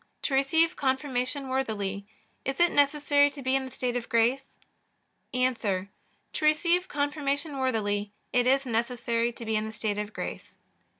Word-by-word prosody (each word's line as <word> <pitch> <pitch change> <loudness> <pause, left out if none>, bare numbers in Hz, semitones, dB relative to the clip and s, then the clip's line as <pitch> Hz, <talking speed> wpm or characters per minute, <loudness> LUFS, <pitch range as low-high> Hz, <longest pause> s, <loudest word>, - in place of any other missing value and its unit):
To 280 - -1
receive 320 +5 +3
Confirmation 265 0 -1
worthily 205 -7 -2 0.4
is 270 0 -3
it 345 0 +5
necessary 285 0 +4
to 280 -1 -8
be 260 +1 +2
in 270 0 0
the 260 - -8
state 250 -1 -2
of 240 -1 -3
grace? 240 +4 +2 0.9
A. 255 0 +2
To 200 -4 -2 0.5
receive 340 +4 +3
Confirmation 285 0 -2
worthily 205 -5 0 0.2
it 245 0 +3
is 270 +1 +3
necessary 235 0 0
to 235 0 -8
be 220 0 0
in 215 0 0
the - - -5
state 210 -1 -2
of 210 0 -4
grace. - - -6
260 Hz, 160 wpm, -28 LUFS, 230-285 Hz, 0.9 s, it